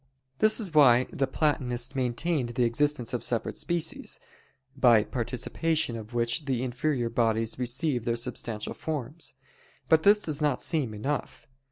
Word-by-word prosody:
This 215 +1 +5
is 195 -7 -1
why 130 -5 +6
the 135 - 0
Platonists 130 -5 0
maintained 130 +2 0
the 125 - +2
existence 125 +1 0
of 125 - -2
separate 115 -2 -1
species, 170 -2 -2 0.6
by 120 -5 +5
participation 125 +5 -1
of 110 +1 -8
which 120 +5 0
the 130 -3 -1
inferior 125 0 -1
bodies 115 0 0
receive 125 +1 0
their 115 - +1
substantial 115 -2 -4
forms. 150 -1 -5 0.5
But 160 -1 +5
this 210 +4 +5
does 155 -1 -1
not 150 -4 +1
seem 140 -10 -1
enough. 140 +8 -4
125 Hz, 145 wpm, -28 LUFS, 120-155 Hz, 0.6 s, why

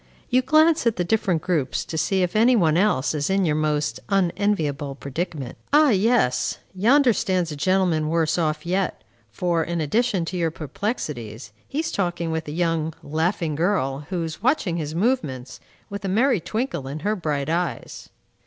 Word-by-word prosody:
You 255 +1 +4
glance 310 +1 +4
at 230 - +2
the 175 - 0
different 180 -4 0
groups 155 -8 -1
to - - -6
see 185 +4 +1
if 180 - -2
any 235 +4 +5
one 165 -8 +3
else 170 -8 +2
is 145 +1 -1
in 195 0 +2
your 150 -2 +1
most 150 -6 0
unenviable 170 -7 0
predicament. 140 -1 -5
Ah, 295 -1 +6
yes! 195 - +2 0.2
Yonder 240 +6 +4
stands 185 -6 0
a - - -4
gentleman 175 -1 +1
worse 165 0 +1
off 155 -1 -1
yet, 185 +1 -1 0.3
for, 170 - 0
in 170 0 -3
addition 195 - +1
to 180 +2 -4
your 165 -2 +1
perplexities, 140 - -5
he 295 - -2
is 325 - -3
talking 175 -3 -1
with 160 -1 -3
a - - -4
young, 165 -1 -1
laughing 160 +1 -1
girl, 145 -4 -1
who 180 -3 -2
is 160 +2 -6
watching 230 - +1
his 155 -1 -4
movements, 145 - -1 0.3
with 200 0 -7
a 195 - -2
merry 235 +3 +3
twinkle 175 - -3
in 145 +3 -6
her 210 +2 0
bright 150 -7 -2
eyes. 170 +2 -3
170 Hz, 175 wpm, -23 LUFS, 155-205 Hz, 0.3 s, Ah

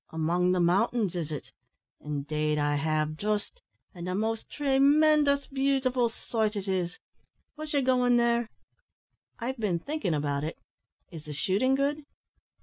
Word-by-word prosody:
"Among 170 +3 +1
the 180 - +1
mountains, 195 +3 +2
is 160 -3 -3
it? 150 - -6 0.5
Indeed 150 +1 -2
I 145 0 +1
have, 155 +1 0
just; 210 - -2 0.3
an' 175 -1 -7
a 180 - -1
most 220 +2 -2
tree 275 -2 0
mendous 290 0 +4
beautiful 265 -3 +1
sight 220 -1 -2
it 200 -1 -4
is. 180 -2 -1 0.6
Wos 305 -1 -7
ye 280 - +4
goin' 250 -1 +3
there?" 235 -1 +2 0.9
"I've 255 +2 -4
been 200 -6 0
thinking 205 - -2
about 145 -1 -1
it. 155 - -4 0.5
Is 160 -3 -9
the 150 - -6
shooting 200 - +1
good?" 285 +2 0
210 Hz, 145 wpm, -28 LUFS, 160-265 Hz, 0.9 s, mendous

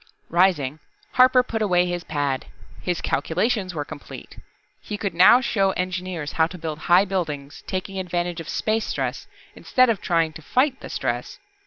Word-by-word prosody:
Rising, 165 -5 +2 0.3
Harper 255 0 +5
put 225 -3 -3
away 180 -4 +3
his 175 -1 -3
pad. 145 -5 -2 0.3
His 180 -2 -2
calculations 185 +1 0
were 145 -2 -3
complete. 155 -1 -10 0.4
He 210 - -5
could 200 -4 -3
now 190 +9 +7
show 195 -6 +1
engineers 180 -4 -3
how 160 0 +2
to 180 - -9
build 160 -2 -5
high 180 +3 +6
buildings, 155 -7 -4
taking 190 0 -3
advantage 175 -1 -2
of 165 - -7
space 220 0 0
stress - - -3 0.3
instead 255 -2 +3
of 210 - -3
trying 165 -2 +1
to 160 - -10
fight 260 - +1
the - - -9
stress. - - -3
180 Hz, 165 wpm, -23 LUFS, 160-205 Hz, 0.4 s, now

